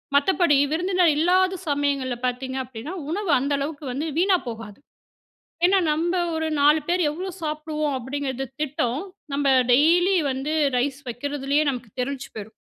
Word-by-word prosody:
மத்தபடி 335 +1 +3 0.2
விருந்தினர் 360 +1 +2
இல்லாத 370 +2 +2
சமயங்கள்ல 280 -3 0
பார்த்தீங்க 260 +1 -3
அப்டின்னா, 255 +6 -8 0.2
உணவு 385 -1 -1
அந்த 280 +2 -1
அளவுக்கு 290 +1 -4
வந்து 290 +6 -3
வீணா 370 +1 +4
போகாது. 225 -2 -7 0.9
ஏனா, 385 +1 +4
நம்ப 335 +4 0 0.2
ஒரு 320 0 -1
4 300 +2 +5
பேர் 355 +1 +2
எவ்வளோ 365 +5 -5
சாப்புடுவோம் 305 -2 -2
அப்டிங்கிறது 270 +1 -4
திட்டம் 290 -2 -1 0.3
நம்ம 280 -1 +1 0.2
டெய்லி 345 +8 +4 0.2
வந்து 275 +4 -3 0.2
ரைஸ் 270 +2 -1
வைக்கிறதுலேயே 280 +4 -1
நமக்கு 240 -4 -7
தெரிஞ்சு 270 +1 -3
போயிரும். 215 0 -8
290 Hz, 135 wpm, -24 LUFS, 265-330 Hz, 0.9 s, 4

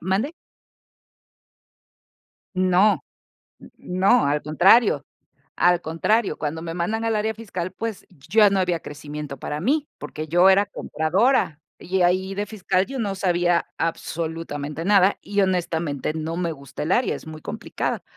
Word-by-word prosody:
¿mande? 195 - -1 2.2
No, 185 +3 +3 0.7
no, 190 +7 +2
al 145 +1 +1
contrario. 195 +9 +4 0.5
Al 175 0 +3
contrario, 195 +7 0
cuando 155 +2 -3
me 165 -1 -5
mandan 210 +7 -2
al 225 -1 +1
área 220 +1 -1
fiscal, 185 -5 -5
pues, 225 +1 -5
y 180 - -23
ya 215 -1 +6
no 195 -1 +1
había 175 -2 0
crecimiento 145 -1 -7
para 150 +4 -5
mí, 290 - +1
porque 150 +1 -6
yo 175 +4 +5
era 195 +1 +5
compradora. 170 - +1 0.2
Y 190 +1 -2
ahí 185 +2 +1
de 205 - -2
fiscal 190 -2 0
yo 270 0 -6
no 205 -4 -1
sabía 175 -2 +1
absolutamente 165 -2 -3
nada 200 -1 +4
y, 200 0 -1
honestamente, 165 -6 -1
no 160 +1 -3
me 170 -2 -1
gusta 140 -2 -8
el 160 +5 0
área, 245 - +2
es - - -9
muy 155 0 -8
complicada. - - -4
180 Hz, 145 wpm, -23 LUFS, 160-200 Hz, 2.2 s, ya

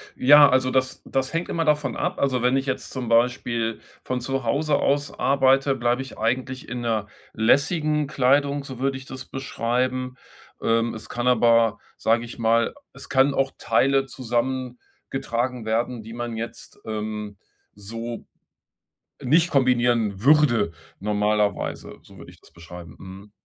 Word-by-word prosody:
Ja, 145 +2 +7
also 130 0 +2
das 130 0 0
das 135 +1 -2
hängt 165 +1 -2
immer 165 -1 -1
davon 150 -4 +1
ab. - - -2
Also 130 -3 +1
wenn 125 +2 +2
ich 135 - -2
jetzt 135 - -4
zum 125 -3 -5
Beispiel 115 -1 +1 0.2
von 125 -1 -3
Zuhause 135 +4 0
aus 140 0 0
arbeite, 135 0 +3
bleibe 120 0 0
ich 135 - -9
eigentlich 130 +5 -2
in 120 0 -4
'ner 110 -3 -1 0.3
lässigen 150 +6 +2
Kleidung, 140 +1 +2
so 130 -3 -9
würde 135 0 0
ich 130 - -11
das 130 0 -8
beschreiben. 130 0 -2 0.5
Ähm, 115 +1 +1
es 110 - -9
kann 120 +1 -2
aber, 115 -2 +4 0.2
sag 115 +1 +2
ich 120 0 -9
mal 115 0 +2 0.2
es - - -11
kann 135 +1 +3
auch 135 0 0
Teile 135 0 +2
zusammen 125 0 -3 0.3
getragen 125 -2 -3
werden, 115 +1 -1
die 115 +1 -10
man 120 -1 -5
jetzt, 115 +1 -8
ähm, 105 -1 -5 0.4
so 115 +3 -7 1.0
nicht 165 +7 +3
kombinieren 120 -6 +2
würde 140 - +4 0.3
normalerweise, 105 0 -1
so - - -17
würde - - -12
ich - - -20
das - - -20
beschreiben, 85 -2 -12
mhm. 95 +2 -12
125 Hz, 150 wpm, -24 LUFS, 115-135 Hz, 1.0 s, Ja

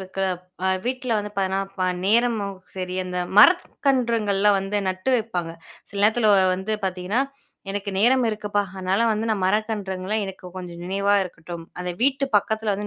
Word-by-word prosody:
இருக்குல்ல. 190 0 -2 0.4
அ - - +3 0.2
வீட்ல 255 0 -2
வந்து 210 0 -4
பார்த்தீங்கன்னா, 195 0 0
இப்ப 185 -2 -2 0.2
நேரமும் 220 -2 +2 0.2
சரி 185 -1 -4
அந்த 180 0 -4 0.2
மரக்கன்றுங்கள்லாம் 230 - +4
வந்து 195 +2 -1
நட்டு 185 +6 -1
வைப்பாங்க. 180 -8 -3 0.4
சில 200 - -4
நேரத்துல 220 0 +4
வ - - +5 0.2
வந்து 190 +4 -2
பார்த்தீங்கன்னா, 185 +5 -1 0.5
எனக்கு 200 0 -3
நேரம் 250 +4 +4
இருக்குப்பா. 210 -1 -1
அதனால 190 +4 +1
வந்து 220 +1 -2
நான் 210 -3 0
மரக்கன்றுங்கள்லாம் 210 0 -1
எனக்கு 185 -1 -9
கொஞ்சம் 175 -2 -7
நினைவா 200 +2 +1
இருக்கட்டும். 170 -2 -8 0.2
அதை 180 0 -3
வீட்டு 275 +1 +2
பக்கத்துல 220 +1 0
வந்து 205 +1 -4
200 Hz, 155 wpm, -23 LUFS, 185-220 Hz, 0.5 s, வ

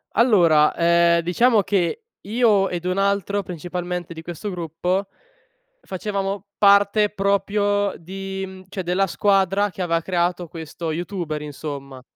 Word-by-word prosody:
Allora, 175 -10 +5
ehm, 170 0 +4
diciamo 215 +6 +3
che 195 - -1 0.2
io 210 -3 +2
ed 175 -1 -4
un 180 +1 -1
altro 200 0 0
principalmente 175 0 -5
di 160 - -9
questo 175 +4 -6
gruppo, 180 +2 -2 0.7
facevamo 195 0 -4
parte 205 +1 +5
proprio 205 0 0
di, 195 +2 -6
mhmm, 190 0 -11
cioè 190 -1 -4
della 180 +3 +1
squadra 195 +1 +2
che 190 - -8
aveva 165 -1 0
creato 175 0 -1
questo 160 0 -6
YouTuber, 170 -2 -4
insomma. 140 -3 -7
185 Hz, 130 wpm, -22 LUFS, 170-200 Hz, 0.7 s, Allora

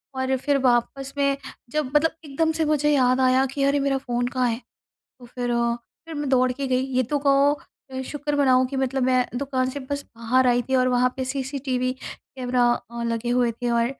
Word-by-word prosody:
और 260 0 0
फिर 285 +2 +1
वापस 255 +3 +1
में 280 -1 +2 0.3
जब 295 0 -2
मतलब 320 +2 +4
एकदम 320 +3 0
से 320 - +2
मुझे 295 -1 +2
याद 255 -1 +3
आया 260 +1 +4
कि 275 +1 -3
अरे! 280 +1 +3
मेरा 275 -1 +1
फ़ोन 245 -2 -2
कहाँ 250 -1 0
है? 230 +2 -3 0.6
तो 245 - -12
फिर 245 0 -4
अ, 235 0 +1 0.3
फिर 325 - -8
मैं 290 -2 -3
दौड़ 255 -1 +3
के 270 +2 -4
गई 255 -1 +2 0.2
ये 255 - +3
तो 290 - +2
कहो 280 +1 +5 0.4
अ, 260 0 -4
शुक्र 295 0 -2
मनाओ 260 -3 +4
कि 265 +2 -5
मतलब 265 0 0
मैं 255 0 +3
दुकान 260 -2 -1
से 285 +2 -5
बस 285 0 -2
बाहर 250 +3 +2
आई 245 0 +3
थी 265 - +2
और 255 0 +3
वहाँ 250 0 +2
पे 260 - -1
सीसीटीवी 265 -1 -2
कैमरा 245 -2 -1
अ, 235 0 -6
लगे 230 0 -2
हुए 245 -1 +2
थे 240 +1 -4
और 235 0 +2
260 Hz, 215 wpm, -24 LUFS, 245-275 Hz, 0.6 s, कहो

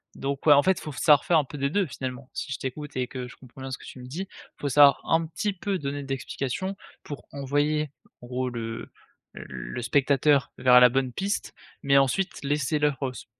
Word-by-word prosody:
Donc, 140 0 -3
ouais, 150 - +8
en 145 - +5
fait 190 -1 +2
il - - -12
faut 155 - -6
savoir 145 +1 +5
faire 170 - +4
un 150 - +3
peu 145 +2 -9
des 140 - +1
2 200 +5 +1
finalement, 130 -3 -6
si - - -5
je - - -2
t'écoute, 145 +3 -6
et 125 -1 0
que 125 -1 -6
je 125 - -13
comprends 130 0 -16
bien 135 - -5
ce 130 - -3
que - - -16
tu - - -10
me 125 - -9
dis? 155 +9 -5
Il - - -18
faut 145 - -1
savoir 140 +1 +6
un 165 0 +2
petit 205 +6 -2
peu 195 +1 -2
donner 140 0 -3
d'explication, 135 +7 -3 0.3
pour 145 - -8
envoyer 145 +2 0 0.3
en 120 - -11
gros 125 +1 -2
le 115 -1 -6 0.4
le 65 - -7
spectateur 140 +2 +3
vers 125 -1 +7
la 125 0 +8
bonne 130 +1 0
piste, 200 +6 -2 0.3
mais 140 0 +4
ensuite 160 +9 0
laisser 145 +1 0
l'œuvre 140 -3 0
se - - -10
140 Hz, 225 wpm, -26 LUFS, 130-150 Hz, 0.4 s, ouais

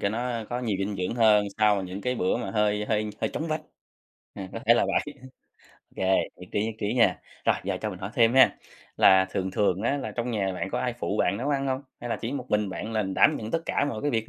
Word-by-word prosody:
cho 100 - +1
nó 115 +1 -3
có 125 +1 -2
nhiều 110 -5 -1
dinh 100 +1 -2
dưỡng 90 +5 -2
hơn, 105 -3 +4
sau 105 -2 +3
những 95 +2 -6
cái 125 +3 -1
bữa 95 -3 0
mà 120 - -4
hơi 105 -1 +1
hơi 105 -1 -1
hơi - - 0
chóng 160 +1 -4
vánh. 155 0 -1 0.7
À, 95 -1 -7
có 115 - -4
thể 120 - +7
là - - +2
vậy, 150 - -1 0.6
ô - - -28 0.2
kê, - - -2 0.3
nhất 90 - -11
trí, 105 - +1
nhất 115 - -4
trí 105 +4 -1
nha. 115 -7 +3 0.2
Rồi - - +4
giờ - - -1
cho 110 - -2
mình 90 - -8
hỏi 95 +3 -5
thêm 115 +1 +4
ha, 130 -2 +6 0.4
là 95 0 +6
thường 95 0 -2
thường 95 0 +1
á 140 +4 +1
là 140 - -4
trong 120 0 -3
nhà 100 -4 -1
bạn - - -3
có - - -1
ai - - -1
phụ - - -2
bạn 100 +3 +1
nấu 130 +6 -3
ăn 140 -1 0
hông? 130 +1 -1 0.2
Hay 120 0 -5
là - - 0
chỉ 120 +4 -5
một 130 -3 -4
mình 105 -1 +1
bạn 110 +4 -5
là 110 -1 +1
đảm 100 +10 +3
nhận 110 0 -6
tất 165 - 0
cả 145 - +1
mọi 110 -3 -5
cái 145 - +1
việc 110 -2 -1
110 Hz, 275 wpm, -26 LUFS, 100-125 Hz, 0.7 s, thể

